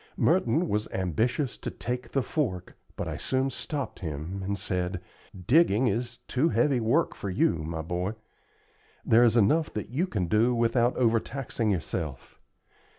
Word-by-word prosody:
Merton 165 -1 +2
was 105 -4 -1
ambitious 110 - -1
to - - -4
take 125 +1 -4
the 135 - 0
fork, 110 - -2 0.2
but - - -4
I - - -4
soon 130 +1 0
stopped 145 -1 -4
him, 80 +4 -5
and 100 +1 -2
said: 90 -1 -2 0.5
"Digging 130 -4 +4
is 120 +1 -1
too 140 +6 +2
heavy 145 -5 +2
work 120 +9 +2
for 100 - -5
you, 90 -2 +2
my 80 +1 -4
boy. 90 +5 -2 0.9
There 115 +2 +6
is 120 0 +4
enough 150 +10 +3
that 105 - -4
you 155 +10 0
can 105 - -1
do 110 +7 +2
without 120 +1 +2
overtaxing 115 0 0
yourself. 80 -7 -3
115 Hz, 155 wpm, -28 LUFS, 95-130 Hz, 0.9 s, There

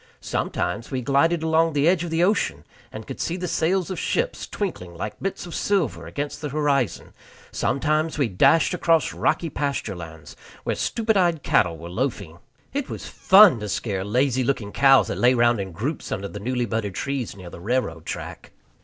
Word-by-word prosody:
Sometimes 115 - -2
we 130 -2 -2
glided 155 +5 +2
along 160 0 +2
the 145 +1 +2
edge 175 -1 +3
of 170 - -4
the 165 +1 +1
ocean, 205 +4 +1 0.3
and - - -8
could - - -8
see 170 - -2
the 180 0 -3
sails 180 +3 0
of 185 - -4
ships - - -1
twinkling 90 - -5
like 105 +5 -6
bits 195 -1 -3
of 175 - -9
silver 195 -6 -1
against 145 0 -5
the 150 - -3
horizon; 140 - 0 0.4
sometimes 155 +3 0
we 140 -4 +2
dashed 135 - +3
across 165 -2 +2
rocky 170 - 0
pasture 140 -8 -2
lands 80 -3 -10 0.3
where - - -1
stupid 220 -2 0
eyed 170 -5 +2
cattle 85 -2 +2
were 85 +2 -9
loafing. 100 - -3 0.3
It 285 -1 -2
was - - -6
fun 190 - +6
to 105 -1 -5
scare 100 -2 -2
lazy 130 +5 +1
looking 120 -5 -1
cows 135 +2 +5
that - - -3
lay 125 +1 +5
round 120 -1 +3
in 95 -1 -6
groups 125 - -4
under 100 +1 -3
the 105 - -7
newly 125 +3 -1
budded 110 -4 -3
trees 135 -4 -3
near 90 -2 -10
the - - -10
railroad 90 -7 -2
track. - - -7
140 Hz, 190 wpm, -24 LUFS, 105-165 Hz, 0.4 s, fun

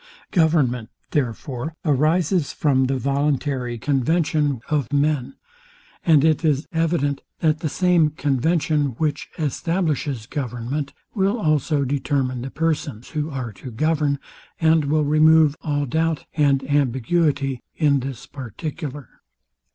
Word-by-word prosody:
Government, 150 - +2 0.2
therefore, 130 +2 -2
arises 155 +3 +2
from 135 -3 +2
the 135 +1 0
same - - -9
voluntary 140 -3 0
conversation 145 +1 +1
of 145 -5 -1
men; 145 - +1 0.7
and 155 -3 +5
it 160 +1 +2
is 150 -1 +1
evident, 160 -4 0 0.2
that 155 -1 +2
the 160 - -2
same 175 -2 +3
convention, 150 -1 0
which 150 -2 -1
establishes 155 - -1
government, 130 +2 -4 0.2
will 200 +2 +1
also 155 -4 +1
determine 135 -2 -1
the 130 - -5
persons 150 -6 -2
who 150 -1 -2
are 130 -6 -5
to 130 - -9
govern, 150 +3 +1 0.4
and 160 -2 +3
will 150 +1 +2
remove 155 0 +5
all 145 -2 -1
doubt 160 +3 -1
and 140 -3 +2
ambiguity 140 0 +1
in 145 -3 +3
this 130 -2 -6
particular. 145 - -6
145 Hz, 120 wpm, -22 LUFS, 135-160 Hz, 0.7 s, and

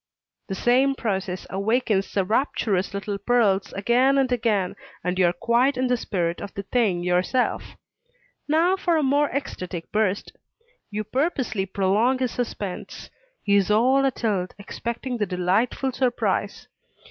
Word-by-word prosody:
The 195 - -3
same 260 +5 +3
process 190 -6 -3
awakens 210 0 0
the 195 -2 0
rapturous 210 -4 0
little 200 0 -4
pearls 205 -3 +2
again 245 +7 +3
and 265 -2 +2
again, 220 -6 0 0.3
and 180 +1 -1
you 180 - +5
are - - +3
quite 240 +9 +1
in 255 - +1
the 250 0 +2
spirit 175 -7 -2
of 200 - -6
the 200 - -4
thing 200 -5 +1
yourself. 180 +8 0 0.7
Now 330 +5 +3
for 345 -3 +1
a 310 - +1
more 285 +2 +2
ecstatic 180 - -5
burst. 210 -2 -1 0.5
You 215 0 -3
purposely 245 - -1
prolong 200 +7 +2
his 255 -2 -1
suspense; 205 -6 -5 0.3
he 200 -1 +3
is 195 -1 +2
all 255 +6 +4
atilt, 215 -8 -1
expecting 235 +4 -5
the 210 - 0
delightful 195 +9 0
surprise. 250 -1 -1
220 Hz, 145 wpm, -24 LUFS, 195-255 Hz, 0.7 s, you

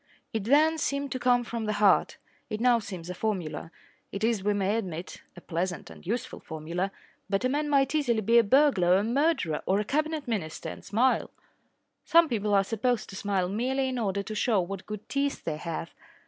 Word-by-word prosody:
It 220 -3 -2
then 310 +6 +4
seemed 280 -1 -1
to 255 - -2
come 245 -1 +3
from 235 -1 -4
the 215 - 0
heart. 205 -1 +3 0.3
It 215 -1 -3
now 245 0 +4
seems 185 -6 -7
a - - -4
formula. 180 -6 -3 0.4
It 200 +2 -5
is, 225 -4 +1
we 205 0 +1
may 200 +1 +1
admit, 180 -5 -5
a 175 - -11
pleasant 175 0 -3
and - - -14
useful 245 +5 -3
formula. 170 +5 -4 0.4
But 195 +4 0
a - - +3
man 295 +2 0
might 275 -1 +3
easily 245 -8 +1
be 230 +3 +5
a - - +5
burglar 215 -7 +4
or - - +6
a 200 - +1
murderer 240 - +1
or 195 +2 +3
a 210 - -1
Cabinet 305 +2 -1
Minister 185 -10 -3
and - - -9
smile. 245 +5 +1 0.7
Some 335 -1 +5
people 210 -3 +1
are 195 - +5
supposed 225 +2 -1
to - - -9
smile 195 -2 0
merely 260 +7 0
in 255 -1 -2
order 200 -2 -1
to 215 - -6
show 215 0 +2
what 190 +1 -4
good 210 0 -7
teeth 280 0 -1
they 155 -2 -2
have. 165 +1 -5
215 Hz, 205 wpm, -28 LUFS, 190-255 Hz, 0.7 s, or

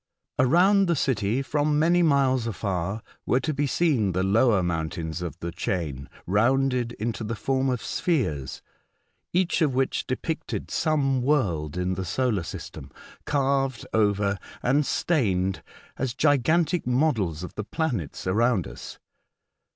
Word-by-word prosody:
Around 185 +9 +4
the 170 - +2
city, 120 -2 0
from 150 +2 +1
many 170 +3 +4
miles 135 -6 +3
afar, 100 0 -3 0.2
were 125 - +3
to 155 - -1
be 145 +1 0
seen 130 - +1
the 90 +2 0
lower 105 0 +3
mountains 80 0 -3
of 85 -3 -5
the 85 - -3
chain 80 -7 -3 0.2
rounded 125 +4 +2
into 110 -1 -3
the 110 +2 -3
form 130 +5 0
of 125 -2 -2
spheres, 80 - -1 0.7
each 180 0 +1
of 145 -5 +2
which 135 0 0
depicted 155 +5 -3
some 140 -5 +1
world 90 - 0
in 90 +1 0
the 95 - -3
solar 110 +2 0
system, 70 -4 -8 0.4
carved 135 -2 0
over 100 -2 +2 0.2
and 140 +4 +2
stained 95 - 0 0.4
as 130 -2 -2
gigantic 155 +3 +2
models 120 - +1
of 90 - -7
the 105 - -4
planets 115 - -3
around 110 +1 +2
us. - - -9
125 Hz, 135 wpm, -25 LUFS, 95-145 Hz, 0.7 s, Around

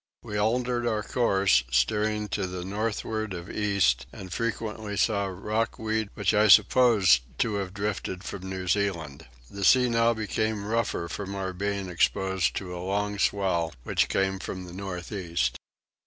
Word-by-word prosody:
We 105 - -6
altered 120 +3 +1
our 110 -2 0
course, 100 - +3
steering 105 - +1
to 100 -1 -1
the 90 0 -5
northward 110 0 -2
of 85 +1 -7
east, 100 - +1
and 95 -2 -8
frequently 110 -2 -3
saw 100 0 +2
rock 105 +4 -2
weed 110 -1 -1
which 105 0 +1
I 105 +1 +4
supposed 105 - +6 0.2
to 110 - +1
have 95 -2 -3
drifted 100 -2 -3
from 95 -2 -6
New 95 -1 -5
Zealand. 85 -7 -1 0.2
The 100 0 -5
sea 125 +5 +5
now 115 0 +3
became 110 -1 -2
rougher 110 -5 -1
from 100 +2 -5
our 95 -1 -3
being 100 +1 -2
exposed 95 +1 +1
to 90 -2 -4
a 90 - -5
long 100 +2 -1
swell 90 -6 +1
which - - +1
came 95 0 0
from 95 0 -6
the 90 - -10
north 90 -2 -6
east. 85 - -1
100 Hz, 160 wpm, -27 LUFS, 90-110 Hz, 0.2 s, supposed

